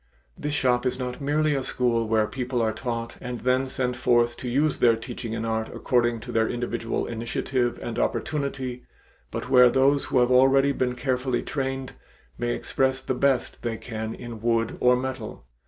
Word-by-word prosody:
This 150 0 -3
shop 125 -3 +2
is 125 - -1
not 125 +1 -5
merely 150 +2 +1
a 135 - 0
school 120 -3 0
where 110 -1 +3
people 125 +3 -3
are 110 -1 +1
taught 115 -1 -4
and 125 -1 -5
then 130 +1 +1
sent 125 -1 -1
forth 120 -1 +2
to 125 - -5
use 145 +5 +1
their 115 -2 +5
teaching 115 0 -6
in 115 0 -3
art 110 0 -1
according 120 -2 +1
to 120 +1 -7
their 115 -1 +2
individual 120 -1 -2
initiative 120 +2 -1
and 120 0 -3
opportunity, 135 -5 -2 0.5
but - - -5
where 125 -1 +8
those 135 +3 +3
who - - 0
have 125 0 +4
already 135 +2 +5
been 125 -2 -1
carefully 130 -1 -1
trained, 135 -1 -3 0.5
may - - 0
express 130 - 0
the - - -1
best 130 -1 +1
they 115 -2 -2
can 110 -2 -5
in 120 -2 -8
wood 115 -1 +1
or 125 0 +5
metal. 125 - -5
125 Hz, 180 wpm, -25 LUFS, 115-130 Hz, 0.5 s, where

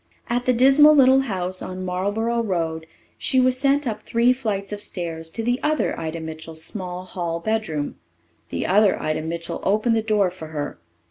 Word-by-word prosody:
At 245 +1 0
the 255 - +4
dismal 275 +5 +6
little 265 -1 +6
house 185 -7 -2
on 185 0 -5
Marlboro 205 +6 -1
Road 165 -6 -2 0.3
she 260 - +1
was 255 0 +3
sent 280 +1 +2
up 215 -3 -3
three 235 +3 +3
flights 210 -6 -3
of 205 - -5
stairs 165 -5 -3
to 225 +8 -4
the 245 +2 0
other 305 0 0
Ida 160 0 -4
Mitchell's 160 0 -6
small 180 -1 -3
hall 170 -2 -3
bedroom. 180 -7 -2 0.5
The 85 - -3
other 200 +1 +3
Ida 155 0 -1
Mitchell 165 +1 -4
opened 215 +4 +2
the 225 - +2
door 210 -4 +1
for 175 -3 -9
her. 150 - -5
200 Hz, 180 wpm, -23 LUFS, 165-235 Hz, 0.5 s, dismal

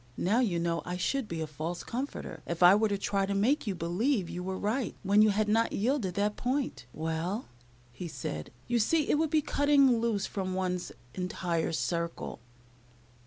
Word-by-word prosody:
Now, 210 +7 +2
you 205 -9 +1
know 170 0 0
I 180 0 -4
should 265 +6 0
be 165 -3 -4
a - - -1
false 155 +3 -5
comforter 260 +4 -5
if 170 +1 0
I 175 +2 +9
were 215 +2 +4
to 200 - 0
try 195 0 0
to 200 - -1
make 240 +7 +2
you 195 - -1
believe 180 - 0
you 180 - -4
were 190 +1 -3
right 225 +5 -1
when 200 +2 +5
you 215 - +6
had 210 +1 +1
not 225 +2 +2
yielded 215 -5 0
that 205 +1 +1
point. 250 - -2
"Well," 165 - -3 0.4
he 170 +9 -6
said, 125 - -5 0.2
"you 240 0 +2
see 300 +7 +2
it 295 - +3
would 320 -1 +2
be 305 0 +2
cutting 280 -5 +4
loose 220 -4 0
from 185 -2 -3
one's 180 -1 -2 0.2
entire 175 -3 -1
circle." 170 -2 -2
195 Hz, 190 wpm, -30 LUFS, 175-235 Hz, 0.4 s, I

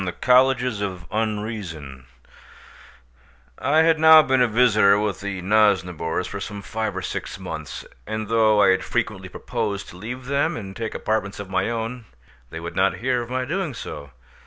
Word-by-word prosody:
THE 90 - -2
COLLEGES 125 -2 +3
OF 95 -3 -4
UNREASON 105 - -4 1.5
I 150 +6 +3
had 160 -1 +3
now 160 0 +8
been 130 -2 +2
a 125 - +5
visitor 110 -4 +4
with 105 -4 -2
the 100 -2 -4
Nosnibors 90 -5 +1
for 100 - -6
some 100 0 -6
five 110 0 -3
or - - -4
six - - -5
months, - - -7 0.2
and 110 0 -3
though 110 -2 +4
I - - +5
had 95 0 +2
frequently - - -2
proposed 100 -1 -4
to 90 - -12
leave 125 +6 -7
them 140 +2 0
and 95 -3 -8
take 115 -1 -5
apartments 110 -2 -2
of 100 -2 -7
my 95 +3 0
own, 115 +1 -4 0.4
they 80 - -7
would 85 +1 -7
not 95 +1 +2
hear 125 0 0
of 120 - -7
my 130 0 -2
doing 170 -2 -3
so. 70 -9 -8
110 Hz, 175 wpm, -23 LUFS, 95-125 Hz, 1.5 s, now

